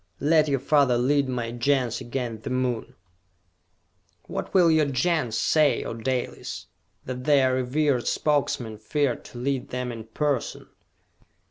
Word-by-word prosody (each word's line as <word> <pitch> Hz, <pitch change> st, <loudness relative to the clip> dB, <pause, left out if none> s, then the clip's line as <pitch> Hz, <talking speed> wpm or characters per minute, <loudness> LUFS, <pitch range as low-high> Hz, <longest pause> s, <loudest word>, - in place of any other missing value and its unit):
Let 155 Hz, +1 st, +3 dB
your 140 Hz, -2 st, +1 dB
father 140 Hz, -3 st, +3 dB
lead 140 Hz, +2 st, +2 dB
my 120 Hz, -2 st, -2 dB
Gens 125 Hz, 0 st, 0 dB
against 120 Hz, -3 st, -4 dB
the -, -, -4 dB
Moon!" 125 Hz, -2 st, -2 dB, 1.3 s
"What -, -, -5 dB
will 175 Hz, -3 st, +5 dB
your 155 Hz, -2 st, +3 dB
Gens 135 Hz, -4 st, 0 dB
say, 155 Hz, -2 st, +3 dB
O -, -, -4 dB
Dalis? 125 Hz, +2 st, -4 dB, 0.4 s
That 125 Hz, 0 st, -5 dB
their 135 Hz, -3 st, +4 dB
revered 130 Hz, 0 st, 0 dB
Spokesman 130 Hz, -7 st, 0 dB
feared 135 Hz, +3 st, -1 dB
to -, -, -11 dB
lead 130 Hz, +1 st, -2 dB
them 125 Hz, -1 st, -3 dB
in 115 Hz, -2 st, -8 dB
person?" 140 Hz, +3 st, -2 dB
130 Hz, 135 wpm, -25 LUFS, 120-145 Hz, 1.3 s, will